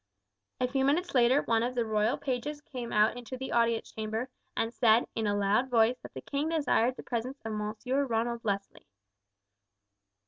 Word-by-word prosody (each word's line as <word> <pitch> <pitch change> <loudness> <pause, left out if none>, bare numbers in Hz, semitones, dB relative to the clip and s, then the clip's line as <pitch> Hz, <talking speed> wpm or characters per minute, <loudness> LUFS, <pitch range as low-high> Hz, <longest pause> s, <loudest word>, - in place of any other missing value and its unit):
A 250 - +2
few 265 +1 0
minutes 325 +7 +1
later 255 +2 +4
one 225 -1 +2
of 245 +2 -1
the 240 -2 +1
royal 215 +3 +1
pages 285 +2 -3
came 250 -5 -7
out 210 +2 +3
into 245 +1 -7
the 265 +1 -5
audience 230 -1 +1
chamber 220 +3 -3 0.3
and 225 +1 0
said 230 -1 +4
in 220 -1 -1
a 205 0 +1
loud 205 +6 +2
voice 235 0 +3
that - - -12
the - - -5
king 290 +2 -2
desired 260 -6 +2
the - - -9
presence 250 +3 -3
of 220 - -3
Monsieur 220 +6 -1
Ronald 235 -1 -1
Leslie. 200 -2 -3
235 Hz, 180 wpm, -30 LUFS, 225-265 Hz, 0.3 s, later